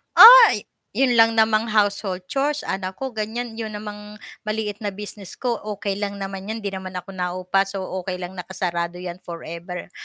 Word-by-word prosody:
Uy! 475 +1 +10 0.3
'Yun 265 -1 +3
lang 225 0 +5
namang 220 0 +3
household 205 -3 0
chores, 290 +2 0
anak 190 -1 -3
ko, 265 +3 -5
ganiyan. 225 +1 -4
'Yun 215 -2 -4
namang 210 0 -8 0.3
maliit 215 -1 -2
na 210 - -4
business 200 -1 -8
ko 240 -3 -2 0.2
okey 200 0 -3
lang 200 -1 -3
naman 195 0 -6
'yun, 220 0 -5
'di 200 - -2
naman 190 -1 -7
ako 180 +1 -6
naupa, 185 +1 -1
so, 195 -1 -5 0.2
okey 185 0 -4
lang 180 0 -6
nakasarado 175 -2 -3
'yan 180 0 -7
forever, 170 +1 -8
200 Hz, 175 wpm, -23 LUFS, 185-220 Hz, 0.3 s, Uy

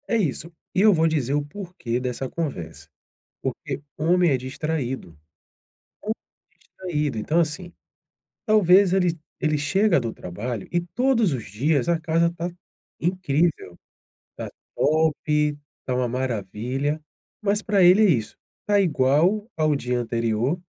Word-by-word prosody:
É 230 - +2
isso. 170 - -2 0.2
E 185 - +2
eu 215 0 +7
vou 165 -1 +3
dizer 145 -5 0
o 145 0 0
porquê 160 - -4
dessa 125 +1 -3
conversa. 90 - -5 0.5
Porque - - -4 0.2
homem 175 +2 +3
é 135 - +3
distraído. 130 - -4 0.9
Ho 215 - -1 0.5
distraído. 150 -8 -3
Então, 150 +10 +1
assim. 170 +2 -1 0.8
Talvez 195 -3 +5
ele 180 -3 +2 0.2
ele 155 -1 +1
chega 185 +4 +3
do 115 -2 -3
trabalho 105 +4 -5
e 175 - +2
todos 225 - +1
os 125 -5 -3
dias, 130 - 0
a 170 -1 +3
casa 165 +1 +2
tá 170 +2 -3 0.5
incrível, 165 - 0 0.6
tá - - -5 0.3
top, 150 -1 +2 0.3
tá 130 - -1
uma 125 0 +1
maravilha. 125 +4 -2 0.4
Mas 205 0 +1
pra 200 -3 +3
ele 180 +4 +7
é 210 - +5
isso. 115 -10 0 0.3
Tá 205 -1 +4
igual 165 +6 +2
ao 155 -1 +2
dia 125 -2 -1
anterior, 115 +5 0
155 Hz, 135 wpm, -24 LUFS, 130-180 Hz, 0.9 s, eu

